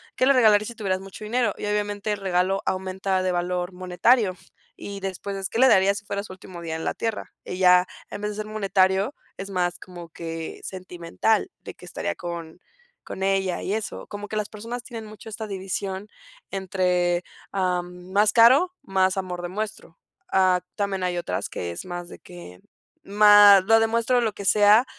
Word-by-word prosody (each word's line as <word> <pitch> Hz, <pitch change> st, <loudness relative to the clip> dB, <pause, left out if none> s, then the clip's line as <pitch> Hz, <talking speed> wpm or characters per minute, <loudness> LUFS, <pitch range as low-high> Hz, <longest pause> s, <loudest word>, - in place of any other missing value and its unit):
¿Qué 255 Hz, -, +2 dB
le 275 Hz, -, +6 dB
regalarías 215 Hz, -5 st, +5 dB
si 235 Hz, -, -7 dB
tuvieras 190 Hz, -4 st, -2 dB
mucho 195 Hz, +2 st, -10 dB
dinero?, 230 Hz, 0 st, +1 dB
y -, -, -5 dB
obviamente 205 Hz, 0 st, -1 dB
el 205 Hz, -, -2 dB
regalo 190 Hz, 0 st, +1 dB
aumenta 190 Hz, 0 st, -1 dB
de 185 Hz, -, +1 dB
valor 180 Hz, +1 st, -2 dB
monetario. 185 Hz, +3 st, +2 dB, 0.4 s
Y 200 Hz, -1 st, -7 dB
después, 195 Hz, 0 st, -4 dB
¿qué -, -, -4 dB
le 265 Hz, -, +7 dB
darías 200 Hz, -1 st, +4 dB
si 205 Hz, -, -24 dB
fueras 200 Hz, 0 st, -4 dB
su -, -, -9 dB
último 185 Hz, -2 st, -11 dB
día 165 Hz, -1 st, -4 dB
en 160 Hz, -, -5 dB
la -, -, 0 dB
tierra?, 225 Hz, -2 st, -4 dB
ella, 180 Hz, 0 st, +4 dB, 0.2 s
en 205 Hz, -, -7 dB
vez 210 Hz, 0 st, -2 dB
de -, -, -7 dB
ser 215 Hz, -, -3 dB
monetario, 195 Hz, +2 st, +1 dB, 0.2 s
es 195 Hz, +1 st, -6 dB
más 175 Hz, -2 st, -1 dB
como 175 Hz, -2 st, -11 dB
que 165 Hz, 0 st, -6 dB
sentimental, 185 Hz, -, -1 dB
de -, -, -8 dB
que -, -, -15 dB
estaría -, -, -4 dB
con 170 Hz, -1 st, -7 dB, 0.5 s
con 190 Hz, -, -7 dB
ella 195 Hz, -1 st, 0 dB
y 195 Hz, -, -2 dB
eso. 215 Hz, -2 st, -4 dB
Como 205 Hz, 0 st, -7 dB
que 215 Hz, -, -6 dB
las 210 Hz, -1 st, -2 dB
personas 230 Hz, +3 st, -6 dB
tienen 230 Hz, -3 st, -8 dB
mucho 215 Hz, +1 st, -11 dB
esta 220 Hz, 0 st, -6 dB
división 195 Hz, 0 st, -4 dB, 0.4 s
entre, 180 Hz, -2 st, 0 dB, 0.3 s
am, 180 Hz, -1 st, -2 dB
más 205 Hz, +2 st, +3 dB
caro, 260 Hz, +10 st, +6 dB
más 190 Hz, -5 st, +1 dB
amor 180 Hz, -2 st, -4 dB
demuestro, 205 Hz, -2 st, -5 dB, 0.3 s
am, 185 Hz, -1 st, +3 dB
también 200 Hz, -2 st, -2 dB
hay 180 Hz, -1 st, -1 dB
otras -, -, -3 dB
que 85 Hz, -, -5 dB
es 85 Hz, -, -7 dB
más 175 Hz, -1 st, -6 dB
de -, -, -10 dB
que, 175 Hz, -, -12 dB, 0.4 s
más 205 Hz, -1 st, +7 dB
lo 225 Hz, +1 st, +6 dB
demuestro 230 Hz, +2 st, +2 dB
o 245 Hz, -, +3 dB
lo 220 Hz, -3 st, 0 dB
que 200 Hz, -, -8 dB
sea, 210 Hz, +4 st, +6 dB
195 Hz, 185 wpm, -24 LUFS, 180-210 Hz, 0.5 s, le